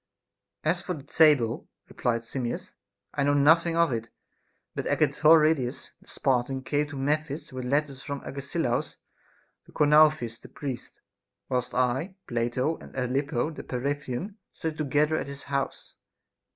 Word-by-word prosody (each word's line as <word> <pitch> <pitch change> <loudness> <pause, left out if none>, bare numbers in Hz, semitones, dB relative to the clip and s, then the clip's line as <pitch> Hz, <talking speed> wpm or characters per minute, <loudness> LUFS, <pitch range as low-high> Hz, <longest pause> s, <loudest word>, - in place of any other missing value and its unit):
As 170 +3 +1
for 180 -1 -3
the 140 - -10
table, 145 -6 +3 0.2
replied 115 -1 -1
Simmias, 120 0 -4 0.4
I 145 - -1
know 145 +1 +3
nothing 165 +4 +4
of 170 -4 +4
it; 115 0 -3 0.6
but - - -3
Agetoridas 155 -4 +3
the - - -23
Spartan 130 0 0
came 145 +2 0
to 145 -1 -8
Memphis 145 +1 -2
with 130 -1 -4
letters 140 0 0
from 140 +1 -5
Agesilaus 140 -2 -2 0.7
to - - -16
Chonouphis 150 -6 +4
the - - -13
priest, 135 -4 -6 0.5
whilst 125 -2 -1
I, 130 +9 0
Plato, 120 +6 0
and - - -13
Ellopio 135 +3 0
the - - -6
Peparethian, 140 - -3
studied 160 -1 -5
together 150 +2 +2
at - - -3
his 140 0 -8
house. 140 -1 -3
140 Hz, 140 wpm, -27 LUFS, 125-155 Hz, 0.7 s, nothing